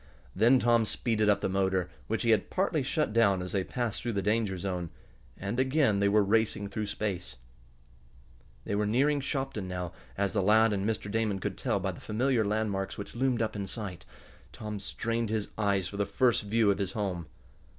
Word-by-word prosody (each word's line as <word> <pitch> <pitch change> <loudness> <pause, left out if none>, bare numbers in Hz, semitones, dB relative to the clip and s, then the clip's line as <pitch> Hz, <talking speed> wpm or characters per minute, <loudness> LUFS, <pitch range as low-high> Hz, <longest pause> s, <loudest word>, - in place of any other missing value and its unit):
Then 115 +6 +5
Tom 120 -2 +3
speeded 110 -1 0
up 105 - +3
the - - +1
motor, 95 -1 +1 0.2
which 115 +2 -1
he 115 - +3
had 110 -3 +2
partly 185 -5 +1
shut 135 -2 -1
down 100 -5 +4
as 90 - -6
they 95 -2 0
passed 120 +1 -3
through 120 -1 -2
the 100 -1 -1
danger 105 -2 +1
zone, 90 -2 -3 0.5
and 100 +6 -3
again 130 -5 +3
they 100 0 +3
were 105 +1 +4
racing 105 -1 +1
through 105 +1 -3
space. 100 -7 -3 1.3
They - - -4
were 105 +1 +1
nearing 140 +6 +2
Shopton 135 -8 -3
now, 90 -1 -4 0.3
as 100 -1 0
the 105 - +2
lad 110 +3 +5
and 100 +1 0
Mr. 105 -2 -3
Damon 110 -2 0
could 95 - -3
tell - - 0
by - - -1
the - - -11
familiar 120 +1 +1
landmarks 100 -2 -1
which 100 - -7
loomed 125 -2 +1
up 110 - -3
in 100 -1 -3
sight. 95 -5 -5 0.5
Tom 105 -1 -6
strained 115 +3 -2
his 110 -2 -2
eyes 100 -4 +1
for 100 - -7
the 100 - +1
first 120 +4 +2
view 105 0 +2
of 100 - -1
his 100 -2 -2
home. 95 -7 -3
105 Hz, 200 wpm, -29 LUFS, 100-115 Hz, 1.3 s, Then